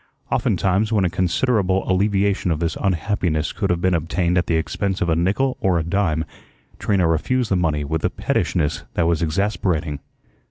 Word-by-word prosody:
Oftentimes 100 +4 +1
when 105 -4 +2
a 90 - 0
considerable 95 +2 +1
alleviation 100 0 +1
of 80 -3 0
this 85 0 -1
unhappiness 90 -4 0
could - - -2
have 85 -1 0
been 95 0 +2
obtained 85 +2 0
at 90 - +1
the 85 - +1
expense 95 +4 -1
of 85 - 0
a 80 - +3
nickel 105 +10 +1
or 95 -3 +2
a 80 - 0
dime, 85 -3 0 0.5
Trina 95 -4 +2
refused 110 +10 0
the - - +4
money 80 -4 0
with 80 +2 -3
a - - +2
pettishness 75 -4 -1
that 85 - +2
was 85 -2 +1
exasperating. 85 -3 -1
90 Hz, 175 wpm, -21 LUFS, 80-100 Hz, 0.5 s, the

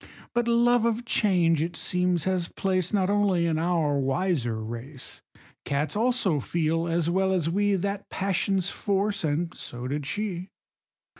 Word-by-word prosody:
But 240 0 +1
love 240 0 +4
of 235 +1 0
change, 175 -8 +2
it 170 +2 -2
seems, 180 -2 0
has 185 -2 0
place 185 -3 -1
Not 195 -2 +2
only 200 -4 +2
in 160 -2 +1
our 160 -4 +1
wiser 135 -3 0
race; 120 +5 -8 0.4
Cats 145 +3 -1
also 225 - +1
feel, 165 +2 0
as 165 -1 0
well 190 +2 +2
as 170 -4 0
we, 205 +2 +2
That 200 +2 -3
passion's 195 0 0
force, 200 0 -1
and 165 +3 -1
so 120 0 -6
did 145 +1 -3
she. 190 -1 -3
180 Hz, 150 wpm, -26 LUFS, 160-200 Hz, 0.4 s, love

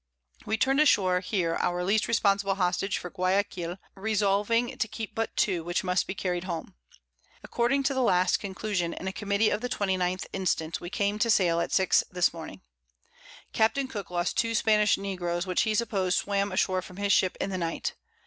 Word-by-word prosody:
We 220 - 0
turn'd 270 +5 +2
ashore 190 -12 +4
here 180 -3 -1
our 175 0 0
least 205 +4 +1
responsible 200 -3 +2
Hostage 190 +1 0
for 180 - -7
Guiaquil, 185 -2 -1 0.2
resolving 210 +3 +1
to 225 - +1
keep 220 -1 -6
but 225 0 -3
two, 180 -5 +1
which 175 +1 -1
must 180 0 0
be 190 - -4
carried 180 -1 -2
home. 170 -3 -5 0.7
According 255 +4 0
to 275 +1 +1
the 260 - 0
last 180 -6 +3
Conclusion 190 -3 -3
in 190 - -6
a 190 - -3
Committee 205 +1 +1
of 210 - -1
the 250 - -3
29th 185 -4 -1
instant, 170 -4 -1
we 175 - -6
came 205 +2 -1
to 230 - +2
sail 175 -6 +3
at 170 - -2
6 190 -1 +3
this 180 -2 +1
Morning. 160 - -9 0.9
Capt. 220 +4 +2
Cooke 205 -7 -6
lost 175 0 -1
2 230 0 +1
Spanish 210 -1 +3
Negroes, 175 -3 -3
which 185 -1 +1
he 215 -1 +1
supposed 195 -5 0
swam 200 0 0
ashore 185 0 +1
from 180 +1 -12
his 200 0 +2
Ship 185 - +2
in 195 - -2
the 185 - -2
Night. 165 -1 -2
195 Hz, 185 wpm, -27 LUFS, 180-215 Hz, 0.9 s, ashore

